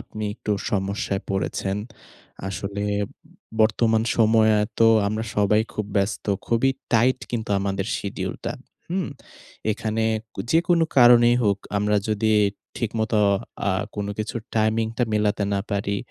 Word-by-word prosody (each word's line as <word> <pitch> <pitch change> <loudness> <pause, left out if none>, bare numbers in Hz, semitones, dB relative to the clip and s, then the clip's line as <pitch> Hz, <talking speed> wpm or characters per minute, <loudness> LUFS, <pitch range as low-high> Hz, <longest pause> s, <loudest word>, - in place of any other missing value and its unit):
আপনি 110 - -8
একটু 105 -1 -3 0.2
সমস্যায় 100 0 -1
পড়েছেন। 95 0 -1 0.7
আসলে 100 +1 -4 0.2
উ - - -8 0.6
বর্তমান 110 0 +3
সময়ে 110 -1 +4 0.2
তো 115 - +6 0.2
আমরা 110 +2 -2
সবাই 105 +1 +4
খুব 105 - -3
ব্যস্ত। 100 +1 0 0.2
খুবই 120 +3 +2 0.2
টাইট 125 +3 +4
কিন্তু 110 -3 -3
আমাদের 95 0 -2
শিডিউলটা। 100 - -4 0.4
হুম? 185 0 -1 0.6
এখানে 110 +1 -2 0.3
কু - - -4
যেকোনো 170 0 +3
কারণেই 120 -1 +7
হোক, 100 -3 +2 0.2
আমরা 105 +1 +2
যদি 110 +1 +1 0.4
ঠিকমত 110 -1 -2 0.6
আ - - +3 0.2
কোন 100 -1 -3
কিছু 110 +2 -3 0.2
টাইমিংটা 110 +2 +1
মেলাতে 105 -1 +1
না 100 - 0
পারি 100 0 -1
110 Hz, 125 wpm, -24 LUFS, 100-115 Hz, 0.7 s, কারণেই